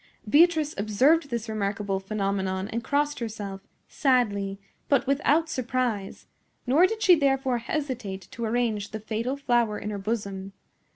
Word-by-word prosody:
Beatrice 310 +3 +4
observed 265 +10 +3
this 235 -2 -3
remarkable 200 -2 -2
phenomenon 195 -1 -2
and 230 +1 -3
crossed 290 0 0
herself, 210 -4 -5 0.3
sadly, 205 -8 +1 0.3
but 280 -2 +3
without 290 +4 +2
surprise; 250 -7 -2 0.4
nor 295 +9 +5
did 440 +2 -4
she 370 - +7
therefore 270 -5 +2
hesitate 235 -7 -4
to 235 - -6
arrange 220 -3 0
the 215 - -5
fatal 225 +5 -3
flower 240 -6 +1
in 210 - -5
her 205 - -4
bosom. 195 -2 -4
230 Hz, 135 wpm, -26 LUFS, 205-275 Hz, 0.4 s, she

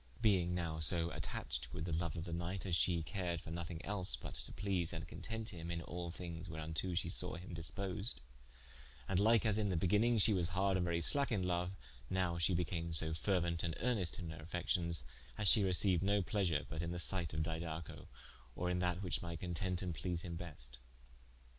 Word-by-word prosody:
Being 95 -6 +3
now 85 -3 -2
so 85 +1 +4
attached - - -4
with 80 - -3
the 85 - -3
loue 85 +2 +1
of 80 - -3
the 85 -1 -5
knight 85 +3 -3
as 90 -3 +1
she 85 0 +2
cared 90 -2 -2
for 80 - -9
nothing 85 0 -5
els, 100 -3 +1
but - - -7
to - - -5
please 95 -5 -1
and 80 0 -5
content 110 +3 -4
him 85 -2 -6
in 85 -1 -2
al 85 +1 -5
things 85 0 -6
wherunto 80 +3 -3
she 85 - +1
sawe 90 +1 +2
him 90 0 -8
disposed, 95 +5 -2 0.9
and 90 - +2
like 110 +2 +5
as 110 -1 +2
in 105 -2 +1
the 90 - +1
beginning 105 +8 +3
she 110 +1 +5
was 90 -3 +1
harde 95 +2 +2
and 90 -1 +1
very 85 -1 0
slacke 140 - +3
in 95 -5 +1
loue, 90 0 +1 0.4
nowe 90 -2 0
she 85 +2 +3
became 85 -1 -1
so 80 0 +2
feruent 85 -1 +1
and 85 -2 -1
earnest 100 -11 0
in 85 -3 -5
her 80 - -8
affections 85 -2 0 0.3
as 105 - +3
she 110 - +8
receiued 95 -1 +4
no 100 0 +3
pleasure 90 -6 +1
but 80 0 -3
in 85 - -2
the 90 - -3
sight 85 0 +2
of 80 - -1
Didaco, 80 -1 -5 0.5
or 90 0 -1
in 90 - 0
that 90 +1 0
which 90 - -1
might 85 -2 -5
content 90 +1 -1
and 90 -2 -2
please 85 +3 -2
him 85 -2 -4
best. 70 -8 -8
85 Hz, 210 wpm, -37 LUFS, 85-95 Hz, 0.9 s, she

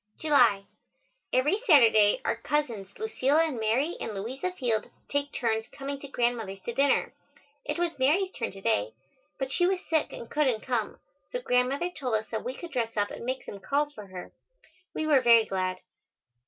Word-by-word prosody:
July. 245 -10 +4 0.7
Every 295 +11 +2
Saturday 225 - +6
our - - +1
cousins, 230 -6 -2
Lucilla 320 -8 +2
and 280 -7 -3
Mary 245 +10 +1
and 215 - -4
Louisa 260 - -3
Field, 240 -10 -1 0.2
take 285 0 -1
turns 225 -2 -1
coming 275 0 -6
to 280 - -9
Grandmother's 235 -6 -1
to 235 - -4
dinner. 275 +3 +2 0.5
It 295 +2 -2
was 340 -4 -1
Mary's 350 +9 +3
turn - - -4
to 195 - -11
day, 105 - 0 0.4
but 265 -1 -3
she 350 +4 +2
was 380 0 +2
sick 315 -2 +1
and 235 - -8
couldn't 260 -7 +1
come, 240 -5 -1 0.3
so - - -3
Grandmother 275 - +1
told 260 -8 -2
us 215 0 -1
that 220 - -3
we 255 +2 -4
could 345 +3 -9
dress 230 -4 -2
up 205 0 +1
and - - -7
make 260 +2 -3
some 200 - -8
calls 290 +7 0
for 210 -5 -10
her. 185 -1 -9 0.6
We 315 - -1
were 290 -4 +4
very 235 -2 +6
glad. 185 -2 -2
255 Hz, 180 wpm, -28 LUFS, 220-295 Hz, 0.7 s, Saturday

